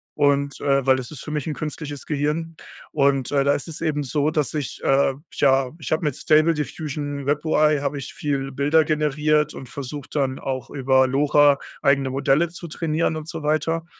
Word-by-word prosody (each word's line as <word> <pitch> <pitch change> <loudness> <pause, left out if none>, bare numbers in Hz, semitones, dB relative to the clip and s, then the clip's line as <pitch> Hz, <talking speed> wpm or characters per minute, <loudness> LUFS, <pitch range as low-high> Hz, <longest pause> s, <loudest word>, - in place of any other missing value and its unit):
Und, 140 -1 +1
äh 135 -1 +2
weil 130 -1 +4
das 125 +1 -6
ist 145 - -8
für 155 - -7
mich 150 0 -3
'n 155 - -1
künstliches 150 -1 -6
Gehirn. 155 +2 -2 0.4
Und, 140 -3 +1
äh, 140 -1 +2
da 140 - +4
ist 145 - -3
es 155 - -7
eben 150 -3 0
so, 145 +3 0
dass 150 -5 -1
ich, 145 -4 -4
äh 135 0 +3 0.2
ja, 135 -2 +3
ich 150 - -7
habe 160 - 0
mit 150 -4 0
Stable 155 +1 +4
Diffusion 145 -1 -4
WebUI 150 0 +2
habe 140 0 -2
ich 130 - -7
viel 135 -2 -2
Bilder 145 +4 +3
generiert 150 0 +1
und 130 -2 -9
versucht, 140 +1 -7
dann 135 -2 0
auch 130 -1 -4
über 130 -1 +3
LoRa 145 +1 +4 0.2
eigene 135 -1 +2
Modelle 140 +5 +2
zu 170 0 -9
trainieren 160 0 -1
und 155 0 -6
so 160 -2 -6
weiter. 160 +2 0
145 Hz, 195 wpm, -23 LUFS, 135-155 Hz, 0.4 s, weil